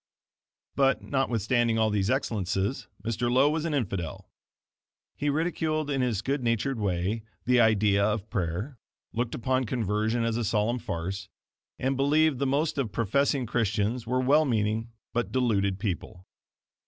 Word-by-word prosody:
But, 135 -1 +2
not 135 -1 0
withstanding 115 0 +1
all 110 -1 +2
these 100 -1 +1
excellences, 105 -4 -1 0.2
Mr. 120 +1 -1
Lowe 135 +4 +4
was 160 +1 -1
an 160 -3 0
infidel. 95 - -3 0.8
He 145 - -1
ridiculed 155 -1 0
in 135 -2 +1
his 115 -5 0
good 140 +1 -1
natured 115 +2 0
way, 100 +2 -1 0.2
the 125 0 +4
idea 105 -3 +4
of 105 0 0
prayer, 100 - -3 0.3
looked 120 +1 -1
upon 130 +2 0
conversion 110 0 0
as 115 0 0
a 120 - -1
solemn 110 +3 +1
farce, 95 +1 -4 0.5
and 135 +1 0
believed 145 +1 +3
the 140 - +1
most 145 +2 0
of 120 -6 -1
professing 135 +4 +1
Christians 110 +1 0
were 130 +1 +1
well 145 +5 +4
meaning 115 -3 0 0.2
but 115 -4 -1
deluded 100 -6 +1
people. 95 -2 -4
115 Hz, 150 wpm, -27 LUFS, 105-135 Hz, 0.8 s, Lowe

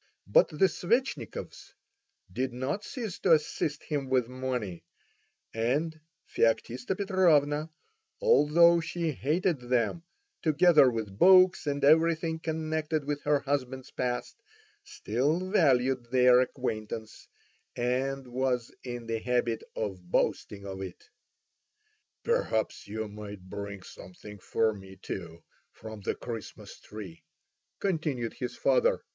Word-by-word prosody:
But 100 - +5
the 155 +5 +3
Svetchnikovs 185 - -2 0.6
did 130 +2 -2
not 135 +11 -3
cease 225 -8 -6
to - - +4
assist 150 -1 0
him 140 -4 -3
with 130 -3 +2
money, 125 -8 -4 0.7
and 145 +8 -1 0.3
Feoktista 120 +7 0
Petrovna, 160 -6 +2 0.5
although 170 - +5
she 165 0 -2
hated 155 +4 0
them, 125 +5 0 0.4
together 155 -3 +5
with 110 -4 -5
books 185 -3 +6
and 145 0 -1
everything 160 +2 +3
connected 155 -1 -2
with 145 0 -2
her 145 -1 +3
husband's 130 -2 -3
past, 125 - -3 0.4
still 155 - -1
valued 130 - +3
their 125 0 +6
acquaintance, 110 -4 -4 0.5
and 130 +3 -1
was 125 -1 -1
in 120 -2 -6
the 115 0 -2
habit 120 -1 0
of 95 -5 -5
boasting 100 +2 -1
of 95 -1 -6
it. 95 -2 -8 1.2
"Perhaps 465 - -1
you 110 +1 -4
might 105 -2 -9
bring 100 -2 -6
something 105 +3 -12
for 110 +3 +1
me 95 -1 -12
too 85 -3 -7 0.3
from 110 -1 -10
the - - -2
Christmas 115 -2 -8
tree," 100 -6 -10 0.6
continued 155 - -1
his 125 -2 -5
father. - - +2
130 Hz, 115 wpm, -29 LUFS, 110-160 Hz, 1.2 s, books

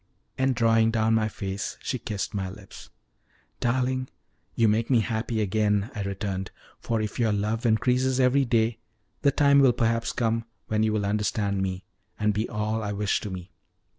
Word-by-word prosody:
And 130 -1 +1
drawing 115 -1 +4
down 115 0 +2
my 110 -1 +2
face 100 -1 -4
she 130 - -3
kissed 105 -4 -4
my 95 -2 -2
lips. 95 +1 -12 0.7
"Darling, 130 +1 0 0.5
you 115 - +4
make 110 +2 +1
me 120 -4 +4
happy 110 0 -2
again," 105 +2 +1
I 105 - -4
returned, 95 -1 -3 0.3
"for 115 -2 -1
if 105 - -5
your 115 -2 +2
love 105 +3 0
increases 125 +3 +2
every 130 +2 +4
day, 115 -1 +1 0.4
the 140 - +4
time 140 0 +4
will 135 -3 +6
perhaps 115 0 0
come 115 -1 0 0.2
when 110 0 +1
you 110 0 +2
will 105 -1 0
understand 100 -1 0
me, 95 0 -3 0.4
and 105 -1 +2
be 105 +3 -1
all 110 0 -1
I 105 -1 -3
wish 105 0 0
to 105 - -6
me." 90 -1 -7
110 Hz, 175 wpm, -26 LUFS, 105-120 Hz, 0.7 s, will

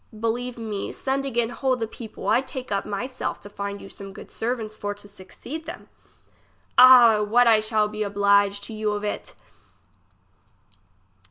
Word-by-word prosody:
Believe 240 +2 -2
me, 215 -3 -4
send 270 0 -2
again 240 -3 0
whole 260 +1 0
the 230 -2 -2
people; 225 0 -9
I 240 - +4
take 260 -3 -7
upon 200 +1 -2
my 205 +4 -2
self 255 0 -4
to 205 - -11
find 200 0 -5
you - - -10
some 195 0 -10
good - - -12
servants 225 -2 -3
for 205 -1 -4
to 205 0 -11
succeed 210 +10 -9
them. - - -9 0.9
Ah! 245 -4 +8
what 230 +4 +4
I 225 -2 +6
shall 215 0 +1
be 215 0 -6
oblige 200 0 +2
to 220 - -7
you 215 -1 -1
of 205 0 -4
it 205 - -4
215 Hz, 170 wpm, -24 LUFS, 205-245 Hz, 0.9 s, Ah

